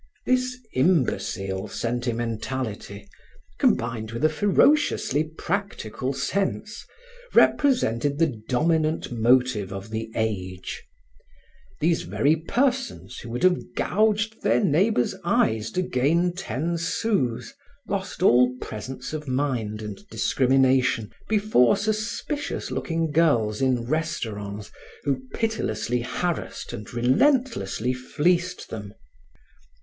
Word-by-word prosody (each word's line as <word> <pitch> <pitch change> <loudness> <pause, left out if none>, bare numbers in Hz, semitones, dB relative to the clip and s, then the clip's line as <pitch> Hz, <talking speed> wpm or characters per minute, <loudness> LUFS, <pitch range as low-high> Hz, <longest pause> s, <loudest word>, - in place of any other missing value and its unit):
This 255 0 +1 0.2
imbecile 110 - +1
sentimentality, 115 -2 -3 0.5
combined 115 -2 +1
with 115 +6 0
a - - +5
ferociously 190 - +3
practical 160 - -3
sense, 200 +8 -2 0.5
represented 145 - +3
the 145 -9 0
dominant 155 +4 +1
motive 120 -3 +2
of 100 +2 -7
the 110 0 -4
age. 95 -4 -3 1.0
These 165 +2 +2
very 150 +3 +2
persons 250 - -1
who 115 - -9
would 120 +6 -4
have 185 -1 +4
gouged 220 +2 +1
their - - +3
neighbors' 185 - +2
eyes 110 0 +1
to 185 - +1
gain 170 +5 +1
ten 170 0 -2
sous, 165 - -1 0.3
lost 195 -2 -3
all 125 -5 +5
presence 125 +7 -6
of 150 -1 -5
mind 125 -6 -1
and 105 -2 -6
discrimination 130 -3 +2 0.2
before 205 - +4
suspicious 215 +8 -2
looking 165 -2 -1
girls 135 -9 +2
in 125 -3 +1
restaurants 110 -10 -3 0.3
who 135 -2 0
pitilessly 120 - -1
harassed 160 +8 -3
and 105 - -7
relentlessly 130 - +2
fleeced 170 +8 0
them. 105 -2 -7
130 Hz, 100 wpm, -25 LUFS, 115-180 Hz, 1.0 s, a